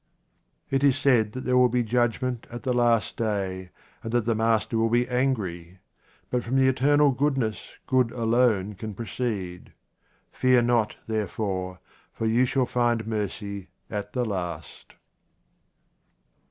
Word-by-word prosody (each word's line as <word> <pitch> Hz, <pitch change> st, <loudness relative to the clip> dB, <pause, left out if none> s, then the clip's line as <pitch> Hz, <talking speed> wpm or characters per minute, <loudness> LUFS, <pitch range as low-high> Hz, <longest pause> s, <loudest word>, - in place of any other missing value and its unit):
It 135 Hz, 0 st, +1 dB
is 140 Hz, -1 st, +4 dB
said 120 Hz, -7 st, +3 dB
that 130 Hz, -, -5 dB
there 125 Hz, -1 st, 0 dB
will 125 Hz, 0 st, +5 dB
be 120 Hz, +1 st, +1 dB
judgment 120 Hz, +1 st, -1 dB
at 120 Hz, 0 st, -8 dB
the 130 Hz, -, 0 dB
last 120 Hz, -2 st, +2 dB
day, 95 Hz, -4 st, -2 dB, 0.3 s
and 115 Hz, -, -5 dB
that 120 Hz, -2 st, +2 dB
the 115 Hz, -, +2 dB
Master 110 Hz, 0 st, +1 dB
will 115 Hz, 0 st, +2 dB
be 120 Hz, +2 st, +2 dB
angry. 100 Hz, -10 st, -2 dB, 0.5 s
But 125 Hz, -1 st, 0 dB
from 125 Hz, +3 st, -2 dB
the 135 Hz, 0 st, +4 dB
eternal 145 Hz, +2 st, +4 dB
goodness 130 Hz, -5 st, -1 dB
good 130 Hz, -3 st, +2 dB
alone 115 Hz, -4 st, +1 dB
can 105 Hz, +1 st, -7 dB
proceed. 105 Hz, -6 st, -4 dB, 0.6 s
Fear 125 Hz, -1 st, +3 dB
not, 120 Hz, -3 st, +1 dB
therefore, 100 Hz, -4 st, -3 dB, 0.3 s
for 115 Hz, -, -3 dB
you 115 Hz, +3 st, +3 dB
shall 130 Hz, 0 st, +1 dB
find 120 Hz, -3 st, 0 dB
mercy 100 Hz, -2 st, -4 dB, 0.2 s
at 105 Hz, -1 st, -4 dB
the 125 Hz, -1 st, 0 dB
last. 90 Hz, -7 st, -6 dB
115 Hz, 140 wpm, -26 LUFS, 105-125 Hz, 0.6 s, will